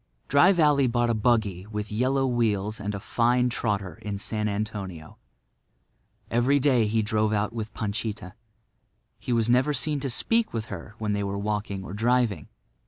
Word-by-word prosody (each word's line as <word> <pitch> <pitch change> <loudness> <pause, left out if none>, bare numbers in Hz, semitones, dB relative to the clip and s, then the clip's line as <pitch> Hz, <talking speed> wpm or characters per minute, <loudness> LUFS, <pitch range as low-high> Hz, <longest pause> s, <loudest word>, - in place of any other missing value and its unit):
Dry 140 +7 +6
Valley 150 -7 +4
bought 120 0 +1
a - - +1
buggy 105 -4 +1
with 105 -1 -5
yellow 130 +5 +1
wheels 110 -4 0
and 105 0 -3
a - - -4
fine 125 +3 +2
trotter 100 -5 -2
in 105 -1 -4
San 105 +1 -2
Antonio. 100 -6 -5 1.1
Every 125 +5 +3
day 125 -5 +3
he 110 +1 +1
drove 110 0 +1
out 105 +1 0
with 110 -2 -5
Panchita. 105 -3 -4 0.9
He - - -5
was 115 -2 +2
never 130 +5 +3
seen 150 +2 0
to 135 0 -3
speak 225 - +1
to 115 - -1
her 105 0 -9
when 105 -1 -2
they 100 0 -1
were 100 0 -3
walking 105 -1 -3
or 95 - -8
driving. 115 -5 +1
110 Hz, 170 wpm, -26 LUFS, 105-125 Hz, 1.1 s, Dry